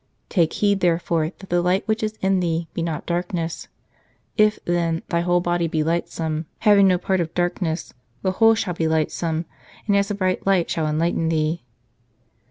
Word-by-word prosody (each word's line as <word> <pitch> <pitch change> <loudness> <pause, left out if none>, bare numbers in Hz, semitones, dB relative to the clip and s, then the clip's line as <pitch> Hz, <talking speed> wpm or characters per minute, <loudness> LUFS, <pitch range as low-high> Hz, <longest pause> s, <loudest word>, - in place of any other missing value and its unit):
" - - -46
Take 170 -5 +2
heed, 200 -1 +2
therefore, 170 -2 +1
that 195 - -13
the 175 0 +3
light 180 +2 +1
which 220 +1 0
is 215 0 -3
in 190 0 +2
thee 165 -1 -1
be - - -3
not 165 -2 -3
darkness. 170 -1 -3 0.7
If, 215 -1 +4
then, 170 -1 0
thy 170 - +1
whole 175 0 +2
body 175 -1 0
be 155 -1 0
lightsome, 160 -1 -2
having 205 -3 +6
no 185 -1 +4
part 190 +1 0
of 165 -1 -4
darkness, 175 -2 -1 0.3
the 190 - +2
whole 225 +4 +5
shall 205 -5 -2
be 165 -1 -1
lightsome, 160 +1 -1 0.4
and 205 - +2
as 200 +1 +2
a 205 - -1
bright 185 -1 -1
lamp 190 -3 +3
shall 160 -2 0
enlighten 165 +1 0
thee." 160 +1 0
175 Hz, 185 wpm, -22 LUFS, 165-190 Hz, 0.7 s, having